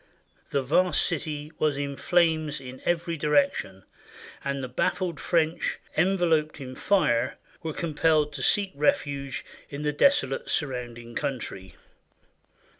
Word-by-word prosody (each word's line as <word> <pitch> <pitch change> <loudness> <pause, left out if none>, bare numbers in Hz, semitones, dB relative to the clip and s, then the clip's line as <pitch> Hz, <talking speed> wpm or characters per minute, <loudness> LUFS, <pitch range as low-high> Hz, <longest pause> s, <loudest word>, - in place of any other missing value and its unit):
The 140 -1 0
vast 175 +7 +3
city 150 -2 -3
was 150 -2 +2
in 140 -1 -3
flames 160 -3 +2
in 130 -1 -9
every 170 -1 0
direction, 140 -10 +1 0.6
and 140 -1 -2
the - - -2
baffled 170 +6 -1
French, 165 -1 +1 0.2
enveloped 165 -3 +2
in 130 -2 -7
fire, 130 -8 +2 0.2
were 160 -2 -3
compelled 155 -2 +1
to 140 - -5
seek 200 +8 +2
refuge 140 -1 0 0.2
in 145 +1 -5
the 150 0 0
desolate 290 - +2
surrounding 120 -5 -2
country. 95 -10 -4
150 Hz, 120 wpm, -27 LUFS, 135-165 Hz, 0.6 s, vast